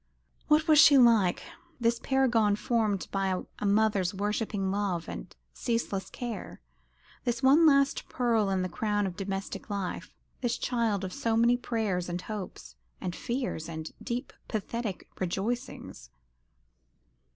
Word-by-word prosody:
What 310 +2 +4
was 310 -2 +6
she 285 -1 +8
like, 225 -8 +5 0.4
this 235 0 +2
paragon 235 -6 +2
formed 215 -3 0
by 190 -2 0 0.2
a - - -3
mother's 200 -3 +2
worshipping 205 -1 -1
love 195 -4 -1
and - - -8 0.2
ceaseless 205 -5 -2
care, 235 -5 -6 0.6
this 240 0 -2
one 295 +5 +6
last 275 -2 +3
pearl 230 -5 +1
in 190 -1 0
the - - -1
crown 205 +2 -1
of 185 -2 -4
domestic 195 0 -5
life, 200 -3 -4 0.3
this 240 -1 0
child 230 -5 0
of 185 - -4
so 230 -5 0
many 235 +1 +5
prayers 215 -8 -2
and 175 0 -2
hopes, 185 - -7 0.2
and 175 -2 -4
fears, 240 - -3
and 160 -1 -6
deep 245 +3 -4
pathetic 220 -1 -4
rejoicings? 190 - -4
215 Hz, 135 wpm, -29 LUFS, 190-240 Hz, 0.6 s, she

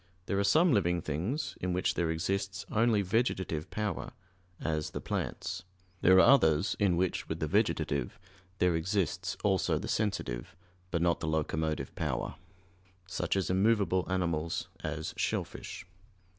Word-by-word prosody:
There 100 - 0
are - - +2
some 155 - +5
living 90 -4 +2
things 90 - -2
in 90 0 -1
which 90 0 +1
there 85 -2 0
exists 95 +4 -2
only 110 -2 +3
vegetative 95 -6 0
power, 105 -4 -3 0.5
as 75 -1 -1
the - - -5
plants. - - -3 0.4
There 95 +1 +7
are - - +9
others 95 - +5
in 95 -5 +3
which 90 0 -1
with - - -3
the - - 0
vegetative 70 -1 0 0.4
there 90 -2 +3
exists 95 +1 -1
also 95 -3 +2
the - - -4
sensitive, 100 - -2 0.3
but 85 -2 0
not 85 -1 +2
the 80 - -3
locomotive 80 -2 -1
power; - - -2 0.7
such 90 - -1
as 95 -1 0
immovable 95 -1 +2
animals, 85 -3 -1
as 80 0 -3
shellfish. - - -3
90 Hz, 145 wpm, -31 LUFS, 80-100 Hz, 0.7 s, are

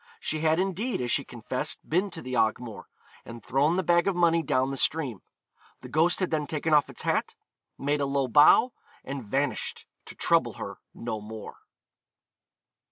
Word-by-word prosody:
She 155 - -2
had 160 +1 +2
indeed, 195 +6 -1
as 125 -1 -1
she 140 - +3
confessed, 125 +6 -3
been 185 +6 +1
to 170 -3 -8
the 130 - -6
Ogmore, 110 0 -1 0.4
and 115 0 -11
thrown 145 +6 +2
the 185 - 0
bag 175 +1 +3
of 195 - +1
money 170 -1 +3
down 130 -2 0
the - - -3
stream; 135 - 0 0.6
the - - -10
ghost 165 +3 +2
had 185 - -1
then 150 -2 -1
taken 155 +1 -1
off 150 -1 +4
its - - -7
hat, - - 0 0.4
made 145 +1 -1
a 140 - +1
low 140 -1 0
bow, 150 - +6 0.3
and 135 -1 -5
vanished, 135 +7 -2 0.2
to - - -10
trouble - - +2
her - - -7 0.2
no 110 -2 -4
more. 110 0 -9
145 Hz, 175 wpm, -27 LUFS, 130-165 Hz, 0.6 s, bow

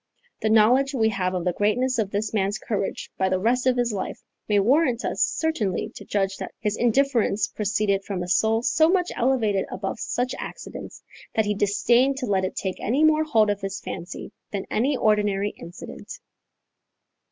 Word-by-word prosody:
The 220 - +1
knowledge 250 +6 +4
we 220 -3 +3
have 185 -3 -1
of 180 -1 -2
the 180 - +1
greatness 245 +6 +1
of 210 -3 0
this 210 +2 -2
man's 205 0 0
courage 205 -3 -3
by 190 0 +2
the 185 - +1
rest 245 +6 +1
of 255 -1 +3
his 240 -2 +1
life, 195 - -4 0.3
may 205 - +3
warrant 250 +3 +2
us - - -2
certainly 250 - 0
to - - -10
judge 195 -1 -1
that - - -7
his 210 0 -1
indifference 240 -3 +2
proceeded 205 -1 0
from 190 -3 -3
a - - -6
soul 220 +5 +2
so 305 +7 +4
much 360 -1 +1
elevated 230 -6 +1
above 195 +3 -4
such 250 +1 -2
accidents, - - -8 0.3
that 220 - +2
he 210 - +1
disdained 235 +6 +2
to 265 - -2
let 190 -4 +1
it 185 - -5
take 190 -1 -3
any 265 +8 +1
more 310 0 +4
hold 220 -9 +3
of 205 0 -4
his 195 0 -4
fancy 175 +2 -7 0.2
than 200 -2 -4
any 260 +5 +1
ordinary 205 -3 +2
incident. 170 +1 -10
215 Hz, 185 wpm, -24 LUFS, 195-250 Hz, 0.3 s, knowledge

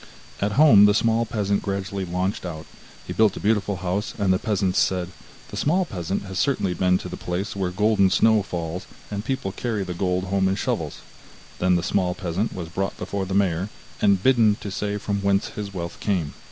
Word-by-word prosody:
At 100 +1 0
home 135 -8 +7
the 105 0 +4
small 115 +1 +2
peasant 100 -2 0
gradually 100 -1 -3
launched 90 +3 -2
out; 80 -3 -6 0.4
he - - -5
built 110 -2 +3
a - - -3
beautiful 105 -1 +1
house, 95 +4 -2
and 100 -3 +2
the 90 - +1
peasants 95 -4 0
said: 90 -2 +1 0.4
'The - - -6
small 180 +5 +2
peasant 95 - -3
has 95 -2 -5
certainly 135 -10 +1
been 90 0 +2
to 90 - -7
the 90 - -6
place 90 +4 -3
where 95 -2 -1
golden 100 +1 +3
snow 110 +2 +4
falls, 85 -2 -5 0.2
and 100 0 -3
people 130 -5 -2
carry 110 0 -2
the 90 - -4
gold 90 0 0
home 95 0 +1
in 95 - +1
shovels.' - - -2 0.6
Then 90 0 +3
the 85 - 0
small 90 -1 0
peasant 95 +3 -2
was 85 -3 -6
brought 95 +3 -3
before 100 -2 -3
the 95 - -2
mayor, 95 -1 +1 0.3
and 100 -2 +3
bidden 115 -5 +4
to 100 - -5
say 105 +1 -2
from 100 -1 -2
whence 100 0 +1
his 105 -1 -6
wealth 85 -3 -6
came. 90 -8 -1
100 Hz, 205 wpm, -24 LUFS, 90-105 Hz, 0.6 s, home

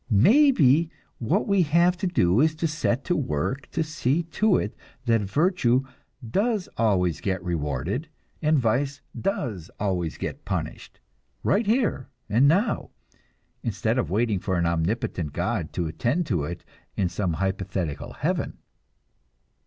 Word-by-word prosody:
Maybe 165 - +5 0.3
what 165 - +1
we 200 -2 +3
have 170 +3 +3
to 190 +2 -1
do 95 - +3
is 155 0 +3
to 165 +1 0
set 145 -4 -1
to 175 - +1
work 130 - -2
to 165 - -1
see 150 +1 0
to 190 +4 +2
it 105 - -3 0.3
that 115 -2 +3
virtue 130 - +2 0.4
does 205 - 0
always 95 -7 +1
get 95 -2 -2
rewarded 85 - -2 0.3
and 155 -1 +3
vice 135 +3 0
does 110 - -3
always 90 -5 -1
get - - -5
punished, - - -5 0.4
right 210 +1 +2
here 220 - +1 0.2
and 120 +6 +4
now, 195 +10 +2 0.7
instead - - 0
of - - -1
waiting 105 +1 +1
for 95 0 -1
an 85 - +1
omnipotent 85 - -1
God 90 -1 -2
to 90 - -1
attend 120 - 0
to 85 - 0
it 85 +3 -7 0.3
in 95 - +2
some 90 0 -1
hypothetical 95 -3 -3
heaven. - - -2
120 Hz, 140 wpm, -25 LUFS, -, 0.7 s, Maybe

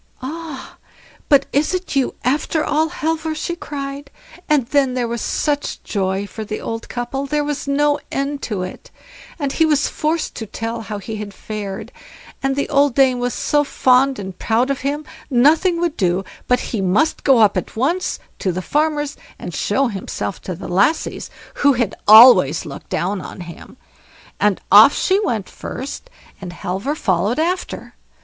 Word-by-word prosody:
"Ah! 310 -1 -7 0.5
but 280 -1 +5
is 300 +6 +2
it 365 -4 -4
you 270 -2 +1
after 300 +4 0
all, 310 +2 +1
Halvor?" 320 0 -2
she 340 +3 -3
cried; 280 -3 -6 0.4
and 295 -5 +3
then 270 0 +1
there 245 -2 0
was 235 0 -3
such 290 -1 -2
joy 195 -1 -1
for 220 +2 -7
the 215 0 -5
old 225 0 -5
couple, 260 +3 -3
there 295 +1 0
was 290 -1 -3
no 290 +1 +2
end 275 +1 -2
to 200 -5 -3
it; 185 - -8 0.5
and 285 -4 -2
he 325 - +3
was 300 -2 +2
forced 315 +1 -1
to 220 - -6
tell 225 +2 -4
how 210 -1 -5
he 215 +2 -6
had 205 -1 -7
fared, 210 +1 -6 0.5
and 270 0 0
the 280 - -1
old 280 -2 +3
dame 265 -2 +4
was 245 0 -1
so 295 0 +1
fond 265 -1 +3
and 190 -2 -7
proud 240 +4 +1
of 275 - -2
him, 290 +3 -3 0.2
nothing 310 +7 +4
would 340 -2 -1
do 185 0 +1 0.2
but 250 - +3
he 215 - 0
must 200 - +1
go 270 -3 +5
up 215 -3 +5
at 185 - -3
once 330 +11 0 0.2
to 185 - 0
the 185 +2 -4
farmer's, 295 - 0 0.2
and - - -7
show 275 - +1
himself 200 -3 -4
to 185 - -5
the 175 - -8
lassies, 200 - 0 0.3
who 285 -1 +5
had 235 -5 0
always 210 - +8
looked 140 -2 -9
down 190 +2 -1
on 180 - -9
him. 170 -1 -11 0.6
And 205 -2 +2
off 215 +7 +9
she 385 +1 +2
went 220 - -1
first, 280 - -7 0.3
and 180 -2 -6
Halvor 195 - -3
followed 200 - 0
after. 355 +4 -2
260 Hz, 175 wpm, -19 LUFS, 210-295 Hz, 0.6 s, off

